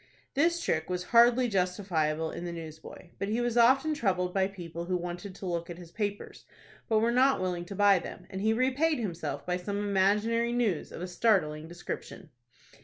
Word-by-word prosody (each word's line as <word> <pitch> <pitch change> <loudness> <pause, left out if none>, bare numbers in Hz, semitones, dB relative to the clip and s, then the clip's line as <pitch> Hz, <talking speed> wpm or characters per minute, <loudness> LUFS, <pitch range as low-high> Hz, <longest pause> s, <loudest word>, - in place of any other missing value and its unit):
This 335 +5 +2
trick 160 - -1
was 180 0 -2
hardly 240 +2 +6
justifiable 180 -6 0
in - - -6
the 175 - -4
newsboy; 160 +1 -9
but 195 - -2
he 220 +3 0
was 240 -1 -1
often 265 +6 +4
troubled 185 -9 0
by 190 -1 +2
people 170 -3 -7
who 180 0 0
wanted 175 +2 -6
to 195 - -8
look 170 -1 -3
at 170 - -7
his 175 -2 -12
papers, 205 0 -4 0.4
but 220 - +3
were 230 +2 +3
not 260 +1 +4
willing 180 -2 -2
to 195 - -8
buy 200 -1 +5
them, - - -9
and 190 -1 -4
he 220 +2 +2
repaid 265 +7 +2
himself 165 - -4
by 180 0 0
some 200 +3 -4
imaginary 210 +4 +1
news 225 -10 0
of - - -7
a - - -3
startling 175 -6 +1
description. 175 0 -7
190 Hz, 190 wpm, -29 LUFS, 175-230 Hz, 0.4 s, hardly